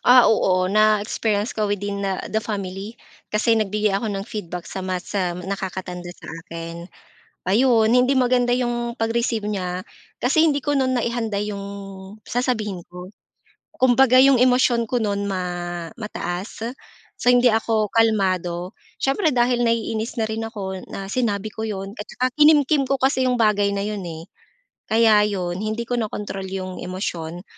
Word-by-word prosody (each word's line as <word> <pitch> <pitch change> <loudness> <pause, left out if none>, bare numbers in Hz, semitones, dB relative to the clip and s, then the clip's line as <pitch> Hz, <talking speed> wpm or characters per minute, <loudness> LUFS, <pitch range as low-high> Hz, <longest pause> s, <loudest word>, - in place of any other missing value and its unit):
Ah 250 0 +8
oo, 185 -4 +2
na-experience 215 +1 +2
ko 215 -1 0
within, 200 0 -2
ah, 190 -1 -2
the 215 - +1
family. 200 0 -5 0.4
Kasi 220 +2 +3
nagbigay 210 0 +1
ako 210 +3 -1
ng 195 - -3
feedback 180 -6 -6
sa - - -6
mas, 185 -1 -4
ah, 180 -2 0
nakakatanda 180 -1 -5
sa - - -14 0.2
akin. 165 +1 -7 0.6
Ayon, 225 +2 +4
hindi 250 +2 +4
maganda 250 -1 +3
'yong 240 -1 -1
pag-receive 225 -1 0
niya 185 -3 -2 0.4
kasi 295 +6 +3
hindi 290 -3 +2
ko 290 -1 0
no'n 260 -1 +2
naihanda 230 -3 -1
'yong 205 -1 -4 0.6
sasabihin 220 -8 -2
ko. 180 +1 -9 0.7
Kumbaga, 255 0 +5
'yong 270 -1 +6
emosyon 245 -2 +3
ko 245 +2 -1
no'n 200 -1 -1
ma 190 -2 -2 0.6
mataas. 210 +1 -4 0.5
So, 245 - +4
hindi 245 0 +5
ako 220 -1 +1
kalmado. 185 -5 +1 0.2
Siyempre 300 +4 +1
dahil 240 0 +2
naiinis 230 0 -1
na 220 - +2
rin 220 +1 -3
ako 190 -4 -6
na 195 0 -5
sinabi 215 -3 -1
ko 220 +1 -5
'yon 195 0 -5
at 210 - -4
tsaka 255 +1 -1
kinimkim 295 -1 +5
ko 275 - +1
kasi 260 -1 +2
'yong 250 - +2
bagay 205 -2 +3
na 200 - -1
'yon, 205 -2 -4
eh. 165 0 -8 0.6
Kaya 220 -1 +5
'yon 185 -3 -2
hindi 215 +2 -2
ko 245 - -2
nakontrol 210 -4 -3
'yong 185 -1 -5
emosyon. 175 -2 -4
215 Hz, 155 wpm, -22 LUFS, 190-240 Hz, 0.7 s, Ah